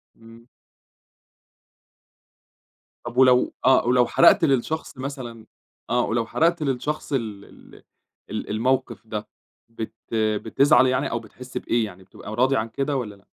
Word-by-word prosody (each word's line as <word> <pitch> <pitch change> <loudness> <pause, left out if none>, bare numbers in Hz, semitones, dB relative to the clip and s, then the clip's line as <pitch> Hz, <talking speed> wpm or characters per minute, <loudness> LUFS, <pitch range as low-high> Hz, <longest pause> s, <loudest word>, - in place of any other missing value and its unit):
امم. 115 +1 -16 2.6
طب 120 +1 -7
ولو 125 -1 +5
آه 130 -2 +5
ولو 125 -1 +4
حرقت 170 - +5
للشخص 140 +2 -1
مثلًا 130 -5 -7 0.4
آه - - +2
ولو 115 0 -1
حرقت 165 +6 +1
للشخص 145 +2 -3
ال 110 -6 -3
ال - - -17 0.5
ال 105 +1 -5
الموقف 115 +1 -1
ده 105 -1 -5 0.4
بت 115 -1 -7 0.2
بتزعل 110 +6 +3
يعني 130 +2 0
أو 115 - -1
بتحس 125 +3 -10
بإيه 115 -1 0
يعني 95 -2 -11
بتبقى 105 +3 -10
راضي 130 +3 +3
عن 110 -1 -1
كده 140 +4 -2
والّا 105 -5 -5
لأ؟ 100 0 -24
120 Hz, 135 wpm, -23 LUFS, 110-135 Hz, 2.6 s, ولو